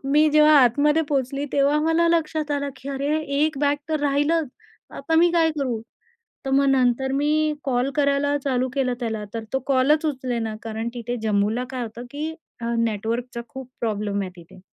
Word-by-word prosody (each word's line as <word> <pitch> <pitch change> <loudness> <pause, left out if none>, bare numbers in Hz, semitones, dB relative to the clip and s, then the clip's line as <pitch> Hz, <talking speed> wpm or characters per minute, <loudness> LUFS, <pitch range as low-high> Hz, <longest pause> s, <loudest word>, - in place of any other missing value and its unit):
मी 305 +1 +5
जेव्हा 305 0 +6
आतमध्ये 290 +6 +3
पोचली, 275 0 -1
तेव्हा 285 +2 +3
मला 325 +2 +2
लक्षात 315 -2 0
आलं, 285 -1 -1
की 270 - -9
"अरे, 280 +3 -1 0.2
एक 310 -2 0
बॅग 285 0 +2
तर 310 -2 -1
राहिलंच, 290 +2 +1 0.4
आता 325 - -3
मी 345 +1 +5
काय 330 -2 +3
करू?" 250 -5 -1 0.7
तर - - -1
मग 275 +1 +4
नंतर 265 0 +2
मी 300 +2 +1
कॉल 255 0 0
करायला 285 0 +2
चालू 255 -2 0
केलं 255 -3 0
त्याला 220 -3 -3
तर 225 -1 -4
तो 265 - +2
कॉलच 280 +4 +3
उचलेना. 245 -6 -2
कारण 225 0 -4
तिथे 240 0 -4
जम्मूला 215 +3 +1
काय 255 -2 -4
होतं 235 +1 -7
की 305 +2 -4 0.3
अ, 235 0 -2
नेटवर्कचा 230 +2 -2
खूप 265 -2 -9
प्रॉब्लेम 210 -2 -1
आहे 185 - -5
तिथे. 170 +2 -15
270 Hz, 175 wpm, -23 LUFS, 235-300 Hz, 0.7 s, जेव्हा